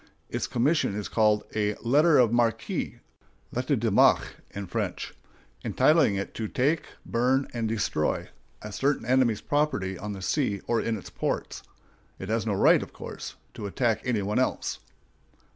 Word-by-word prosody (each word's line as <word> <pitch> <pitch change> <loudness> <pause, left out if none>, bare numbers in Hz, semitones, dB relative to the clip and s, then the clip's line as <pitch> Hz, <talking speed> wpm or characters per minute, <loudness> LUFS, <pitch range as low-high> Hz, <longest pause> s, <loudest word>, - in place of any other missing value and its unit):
Its - - -2
commission 130 -3 +1
is 105 -1 -3
called 105 -1 +2
a 105 -1 +1
"letter 150 +6 +4
of 120 -3 +4
marque" 120 -1 0 0.5
(lettre - - 0
de - - 0
marque - - +4
in 100 0 -6
French), - - -3 0.5
entitling 150 -10 +4
it 100 0 -4
to 110 - -3
"take, 145 +8 0 0.2
burn, 130 +3 +1
and 115 -2 -1
destroy" 100 -8 -1 0.4
a 105 - -6
certain 140 +5 0
enemy's 120 -3 +2
property 145 -11 0
on 105 0 -4
the 95 - -8
sea 100 - 0
or 115 -2 +1
in 115 -1 -1
its 100 - -10
ports. - - -3 0.6
It 95 - -7
has 115 0 0
no 105 - +1
right, - - +5
of - - -8
course, - - -8 0.2
to 100 - -5
attack 115 +2 0
any 115 -5 0
one 105 +5 0
else. 130 - -1
115 Hz, 160 wpm, -27 LUFS, 105-130 Hz, 0.6 s, right